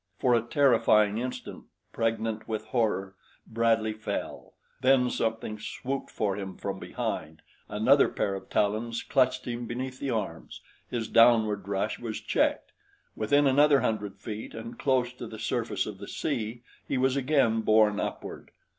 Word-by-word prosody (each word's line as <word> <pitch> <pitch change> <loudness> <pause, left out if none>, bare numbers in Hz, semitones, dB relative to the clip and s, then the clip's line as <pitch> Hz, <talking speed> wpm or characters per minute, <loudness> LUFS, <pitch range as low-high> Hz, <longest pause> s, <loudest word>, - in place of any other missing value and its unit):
For 125 -3 +2
a 115 - +4
terrifying 115 -4 +3
instant, 125 +1 -6 0.3
pregnant 115 -1 -1
with 110 -1 -3
horror, 105 -4 -1 0.3
Bradley 115 -1 +1
fell; 110 0 -5 0.3
then 130 -1 +4
something 110 -1 -2
swooped 135 +5 -4
for 100 -3 -1
him 95 -1 -6
from 95 -1 -4
behind, - - -4 0.3
another 125 +7 +4
pair 100 - -1
of 95 - -7
talons 110 +3 0
clutched 130 -2 +1
him 120 -1 -4
beneath 130 +2 -5
the 140 - -3
arms, 110 -5 -4 0.3
his 115 -3 -2
downward 110 -5 +4
rush 100 +2 -1
was 115 -3 -4
checked, - - 0 0.4
within 145 +7 +3
another 140 0 +5
hundred 105 -4 -2
feet, 105 +1 -7
and 115 +1 -8
close 130 -3 +1
to 125 - -8
the - - -9
surface - - -1
of - - -7
the - - -8
sea 115 +2 -3 0.2
he 135 - -1
was 130 +1 +2
again 135 -5 +2
borne 110 -1 +4
upward. - - -5
115 Hz, 150 wpm, -28 LUFS, 110-125 Hz, 0.4 s, another